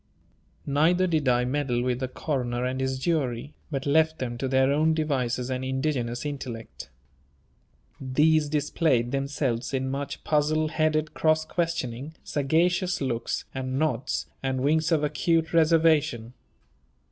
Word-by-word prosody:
Neither 160 +6 +3
did 160 -6 0
I 125 0 +3
meddle 125 -2 0
with 125 -1 -1
the 130 - -2
coroner 125 -3 -2
and 130 +1 -2
his 130 0 -1
jury, 135 -3 -1 0.2
but 135 -3 -3
left 160 +2 +3
them 120 -2 -4
to 135 - -1
their 130 +1 +3
own 155 +2 +2
devices 130 -5 -1
and 130 0 -2
indigenous 130 -2 -2
intellect. 130 -6 -6 1.1
These 150 +3 +2
displayed 145 -4 +1
themselves 135 -3 -1
in 130 0 -1
much 140 +1 -4
puzzle 155 +1 +1
headed 155 -1 0
cross 155 0 +2
questioning, 160 -5 -3
sagacious 175 +5 +1
looks, 120 -4 -2
and 130 0 -3
nods, 155 -1 -1 0.2
and 130 -1 -1
winks 160 +4 +2
of 155 -2 +2
acute 165 +2 +1
reservation. 155 -7 +3
140 Hz, 135 wpm, -26 LUFS, 130-155 Hz, 1.1 s, Neither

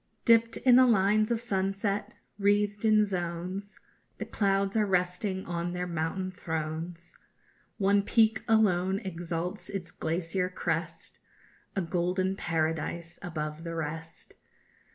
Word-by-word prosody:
Dipped 230 -1 +5
in 250 -1 +6
the 255 0 +7
lines 215 0 +3
of 235 -1 +1
sunset, 195 -2 -1 0.3
wreathed 205 +1 +2
in 215 -1 +5
zones, 185 +2 -4 0.4
The - - -4
clouds 195 -1 +1
are 215 -2 +3
resting 185 +1 0
on 175 0 -3
their 180 0 -2
mountain 175 +2 -2
thrones; 165 -1 -5 0.6
One 200 0 +3
peak 220 +1 +3
alone 190 -4 +3
exalts 175 0 -4
its 180 -3 -5
glacier 175 +3 -1
crest, 165 -2 -3 0.6
_A 190 -4 -1
golden 185 +2 0
paradise 165 0 -2
above 155 -2 -4
the 165 -1 -5
rest. 165 +1 -6
185 Hz, 120 wpm, -29 LUFS, 170-205 Hz, 0.6 s, the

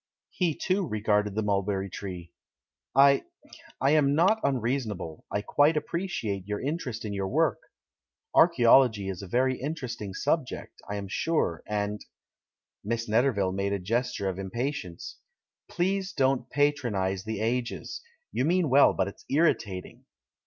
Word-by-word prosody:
He, 170 -5 0
too, 185 -1 0
regarded 105 -2 0
the 110 - 0
mulberry 100 -1 0
tree. 90 -2 -7 0.6
"I 140 0 +6 0.3
— 330 -1 -18
I 135 - +3
am 145 -2 +4
not 190 +8 +4
unreasonable, 115 - -2
I 100 - -2
quite 145 +8 +3
appreciate 150 - -3
your 105 0 -2
interest 130 -6 -3
in 105 - -3
your 100 -1 -2
work 150 0 +1 0.4
— - - -65 0.3
archaeology 120 - +5
is 95 -1 -5
a 100 - -8
very 130 +5 +1
interesting 125 - -5
subject, 145 -1 -2
I 105 - -2
am 100 -1 -4
sure, 100 - 0
and 105 -1 -2 0.4
" - - -66
Miss 115 +2 -2
Netterville 110 -4 +2
made 100 +1 -1
a 100 - -1
gesture 115 +2 -1
of 95 0 -3
impatience. 95 - -4 0.5
"Please 190 +2 -1
don't 130 -2 +1
patronise 120 -10 0
the 110 -1 -4
Ages! 125 - -2 0.3
You - - 0
mean 170 -1 +2
well, 140 +2 +6
but 95 - +1
it's 100 - -10
irritating." 115 - 0
120 Hz, 145 wpm, -28 LUFS, 100-145 Hz, 0.6 s, I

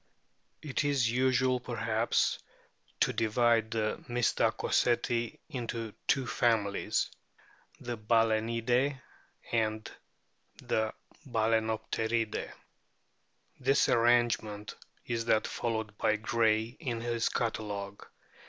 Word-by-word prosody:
It 145 -2 -1
is 135 -5 +2
usual, 130 0 +2
perhaps, 115 -2 0 0.6
to - - +3
divide 115 0 +2
the 110 -1 -2
Mystacoceti 120 0 +1
into 115 -6 -4
two 135 -1 +2
families: 110 -5 +1 0.7
the 120 -2 -5
Balaenidae 115 +4 +2 0.5
and 110 -1 0 0.7
the 110 0 0 0.4
Balsenopteridae, 110 0 0 1.1
This 135 +2 +3
arrangement 115 -3 +2 0.3
is 115 -1 -2
that 110 -2 +3
followed 110 -3 -3
by 110 - +3
Gray 110 0 +2 0.2
in 120 -8 -3
his 115 -1 0
Catalogue. 105 -4 -3
115 Hz, 85 wpm, -31 LUFS, 110-120 Hz, 1.1 s, to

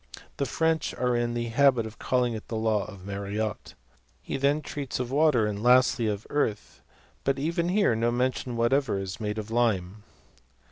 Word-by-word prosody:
The 140 - -1
French 160 -1 0
are 125 -1 0
in 120 0 0
the 120 0 -2
habit 125 -1 +3
of 110 0 -10
calling 125 -2 +1
it 110 - -7
the 115 - -4
law 110 -2 +1
of 100 -3 -11
Mariotte. 100 +2 -4 0.4
He - - -5
then 140 +3 +1
treats 140 -4 -4
of 125 0 -3
water, 145 -6 +3
and 105 -1 -3
lastly 125 -1 +4
of 105 0 -3
earth; 110 -8 -2 0.4
but 135 0 +1
even 170 +4 -1
here 200 - +3
no 115 +1 +1
mention 125 0 -1
whatever 120 -1 +2
is 95 +1 -5
made 105 -1 -3
of 110 0 -5
lime. 105 -4 0
120 Hz, 180 wpm, -27 LUFS, 110-135 Hz, 0.4 s, lastly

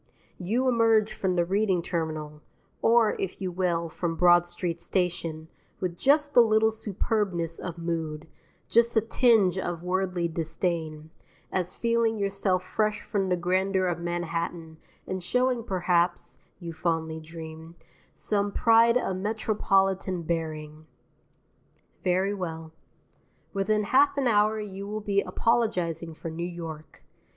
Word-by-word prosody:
You 225 +8 0
emerge 225 -3 +3
from 190 -3 -1
the 175 -1 +2
Reading 190 -1 +1
Terminal 155 -3 -4 0.4
(or, 230 -1 +4
if 190 - -4
you 185 -2 -3
will, 175 -2 0
from 165 +1 -3
Broad 175 0 +5
Street 175 -1 -3
Station) 170 -4 -2 0.3
with 180 -2 -2
just 290 - +2
a 240 - +9
little 220 -1 +4
superbness 195 -5 -2
of 175 -2 -6
mood, 165 -2 -4 0.4
just 235 0 +3
a - - +6
tinge 220 -5 +3
of 175 -2 -4
worldly 180 -1 0
disdain, 160 -1 -3 0.4
as 185 -1 -1
feeling 230 -1 +1
yourself 195 -2 0
fresh 215 +3 -1
from 195 -2 -1
the 180 - +3
grandeur 185 +2 +1
of 175 -1 -1
Manhattan 170 -1 -4 0.3
and 185 0 -4
showing 250 +5 +1
perhaps 175 -3 0 0.2
(you 170 -2 -6
fondly 160 -1 -2
dream) 160 +1 -10 0.4
some 205 -1 -1
pride 230 +2 +5
of 190 -6 -2
metropolitan 195 -3 0
bearing. 155 -2 -4 1.2
Very 190 +2 +1
well. 165 -4 -5 0.8
Within 210 +2 +1
half 280 +6 +3
an 275 - +1
hour 215 -1 +3
you 200 -1 -6
will 215 +1 -4
be 200 -1 +1
apologizing 180 -6 0
for 165 - -6
New 165 +2 -4
York. 165 -3 -9
185 Hz, 130 wpm, -27 LUFS, 170-210 Hz, 1.2 s, a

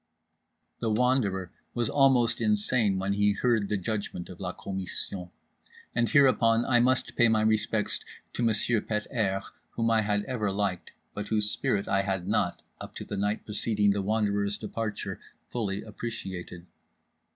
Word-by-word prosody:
_" - - -46
The 115 - -1
Wanderer 105 -6 +1 0.2
was 120 -2 +1
almost 125 -4 +3
insane 105 -1 +3
when 95 +1 0
he 105 0 +3
heard 110 -2 +1
the 105 - +1
judgment 100 -3 -4
of 90 - -10
la 90 -2 -3
commission. 95 -1 -5 0.6
And 120 -1 +1
hereupon 120 -5 +4
I 120 -2 +4
must 130 +1 +2
pay 120 - +5
my 110 -1 +3
respects 110 0 +1 0.3
to - - -3
Monsieur 115 0 +2
Pet 105 -1 -2
airs; 100 -6 0 0.3
whom 115 0 +1
I 110 -1 +4
had 105 -1 0
ever 115 -6 -1
liked, 100 -2 -2 0.2
but 105 0 -5
whose 105 -1 +1
spirit 100 - 0
I 95 - +2
had 95 -2 -2
not, - - 0 0.2
up - - -9
to - - -6
the - - -5
night 105 +2 -1
preceding 105 -1 +1
The 100 0 0
Wanderer's 100 0 0
departure, 110 0 -4 0.3
fully 105 -4 -2
appreciated. 95 -6 -6
105 Hz, 160 wpm, -28 LUFS, 100-115 Hz, 0.6 s, pay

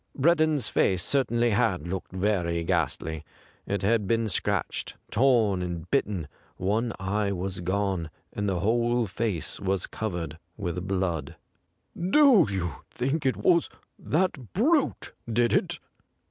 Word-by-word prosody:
Breddon's 155 -1 +3
face 95 -2 +2
certainly 120 -4 +2
had 90 -5 +1
looked 95 0 -4
very 90 -3 0
ghastly; 80 -1 -1 0.4
it 100 -1 -2
had 105 0 +2
been 115 +1 +1
scratched, 95 - -1 0.2
torn 115 -7 +3
and 85 -1 -5
bitten; 95 -7 0 0.3
one 110 +6 0
eye 100 +2 0
was 95 0 -3
gone, 95 -2 -1 0.2
and 105 -1 -1
the 90 -3 -1
whole 120 +3 +2
face 100 -4 -2
was 95 -1 0
covered 85 -7 -4 0.2
with 90 -2 -3
blood. 90 -7 -1 0.4
' 175 +2 -7
Do 270 - +7
you 95 -4 -2 0.2
think 135 +4 -1
it 130 - +1
was 170 -2 +3 0.4
that 155 - 0
brute 285 - +1 0.2
did 120 +1 +2
it - - +1
100 Hz, 130 wpm, -27 LUFS, 90-120 Hz, 0.4 s, Do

